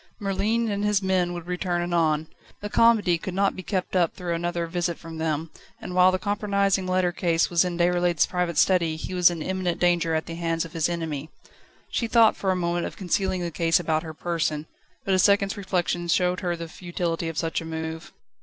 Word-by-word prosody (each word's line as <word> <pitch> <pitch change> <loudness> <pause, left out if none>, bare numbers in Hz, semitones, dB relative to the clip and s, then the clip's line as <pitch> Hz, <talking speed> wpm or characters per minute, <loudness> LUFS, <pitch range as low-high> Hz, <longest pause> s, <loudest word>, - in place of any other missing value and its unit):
Merlin 210 +3 0
and 200 0 -2
his 210 -1 +1
men 185 -2 +1
would 175 -1 -6
return 180 -1 -1
anon. 160 -3 +1 0.3
The 205 0 -6
comedy 215 -7 +4
could 185 +2 -5
not 195 0 +2
be 185 - -6
kept 185 0 -3
up 175 -3 +2
through 175 -2 -3
another 170 0 -2
visit 170 0 -2
from 165 0 -9
them, 160 0 -2 0.3
and 180 - -7
while 185 0 +6
the 185 - 0
compromising 200 -1 0
letter 185 -1 +1
case 170 -2 +1
remained 175 0 +1
in 175 +1 +3
Déroulède's 175 -2 +2
private 180 -2 -2
study 170 -4 +3
he 160 - -6
was 180 -1 +5
in 165 -3 -4
imminent 185 -1 -2
danger 170 -2 +2
at 160 - -1
the 165 - -7
hands 165 -1 -1
of 165 - -11
his 165 0 0
enemy. 160 -3 -4 0.6
She 230 - -1
thought 225 -1 +5
for 195 - -2
a 185 - +2
moment 175 -1 -1
of - - -10
concealing 190 0 -1
the 170 - -3
case 165 +1 +2
about 155 -2 0
her 160 -1 -8
person, 155 -3 -2 0.4
but 195 - +1
a 185 - +3
second's 200 +1 +3
reflection 180 -3 -1
showed 180 +1 +2
her 175 -2 -1
the 165 0 -6
futility 170 -1 -3
of 165 - -7
such 165 -1 -1
a - - -8
move. 160 +1 -5
175 Hz, 210 wpm, -25 LUFS, 165-185 Hz, 0.6 s, while